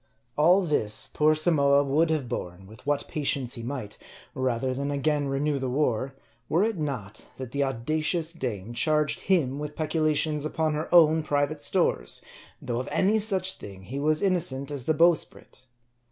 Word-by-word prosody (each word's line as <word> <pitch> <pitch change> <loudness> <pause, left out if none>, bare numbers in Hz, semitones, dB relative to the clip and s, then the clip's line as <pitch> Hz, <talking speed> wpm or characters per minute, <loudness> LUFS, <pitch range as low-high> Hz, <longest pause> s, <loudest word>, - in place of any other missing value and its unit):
All 175 +6 +4
this, 130 -10 +1
poor 155 +1 +3
Samoa 145 -3 +4
would 150 +4 +2
have 155 -5 -1
borne 90 -3 -6
with 110 +7 -15
what 145 -1 0
patience 135 -4 -1
he 115 - -6
might, 120 -4 -6 0.3
rather 130 0 -1
than 140 +2 -3
again 145 0 0
renew 140 +1 0
the 130 -1 -2
war, 130 -1 -1 0.3
were 170 +5 +3
it 220 -5 -1
not, 120 -9 -5
that 130 -2 -7
the 140 - -1
audacious 155 +6 -1
dame 120 - -5
charged 150 +3 +2
him 145 -8 +2
with 150 0 -6
peculations 155 -1 0
upon 155 0 -1
her 155 +1 -4
own 160 -2 +6
private 145 0 -1
stores; 145 - 0 0.4
though 120 -1 -3
of 130 - -5
any 210 +3 +2
such 190 -3 -1
thing 95 -2 -10
he 130 +8 -5
was 155 +3 +1
innocent 160 -8 0
as 140 -4 -5
the 155 - +1
bowsprit. 165 -5 +1
145 Hz, 170 wpm, -26 LUFS, 130-155 Hz, 0.4 s, own